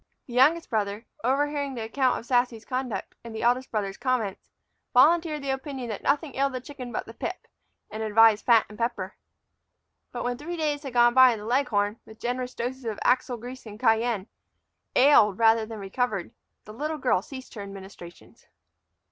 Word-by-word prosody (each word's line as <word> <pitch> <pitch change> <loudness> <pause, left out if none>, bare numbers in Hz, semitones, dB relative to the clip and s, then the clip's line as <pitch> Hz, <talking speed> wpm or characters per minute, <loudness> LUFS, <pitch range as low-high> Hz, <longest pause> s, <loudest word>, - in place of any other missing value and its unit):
The 245 - -11
youngest 300 +7 +4
brother, 210 0 -1 0.2
overhearing 285 +1 0
the 230 - -4
account 255 +3 +1
of - - -8
Sassy's 245 -2 +1
conduct 255 -3 -4
and 230 -1 -8
the 220 - -4
eldest 250 +2 +2
brother's 200 -3 -3
comments, 245 -6 -2 0.5
volunteered 310 +2 +4
the 275 - -1
opinion 265 -2 -5
that 215 - -5
nothing 285 +1 0
ailed 275 0 +1
the 255 - -3
chicken 255 -1 -9
but - - -3
the - - -11
pip, - - -5 0.5
and 215 - -5
advised 220 0 +5
fat 230 -3 +5
and 210 +2 -13
pepper. 230 -5 -2 1.0
But 245 - -4
when 245 0 -2
three 345 +3 -5
days 300 -2 -1
had 270 -4 -7
gone 240 0 +5
by 260 -1 +7
and 215 - -6
the - - -8
leghorn, 225 -4 +1
with 220 0 -15
generous 250 +1 -3
doses 255 +2 -4
of 220 -3 -3
axle 250 -1 +2
grease 245 +1 -9
and 210 0 -10
cayenne, 225 -4 +2 0.7
ailed 235 -8 +6
rather 225 -1 +4
than 225 -1 -7
recovered, 200 -1 -2 0.3
the 215 - -10
little 305 +6 -3
girl 250 -10 +2
ceased 260 +4 -10
her 210 - -7
administrations. 195 -3 -12
245 Hz, 180 wpm, -26 LUFS, 220-265 Hz, 1.0 s, by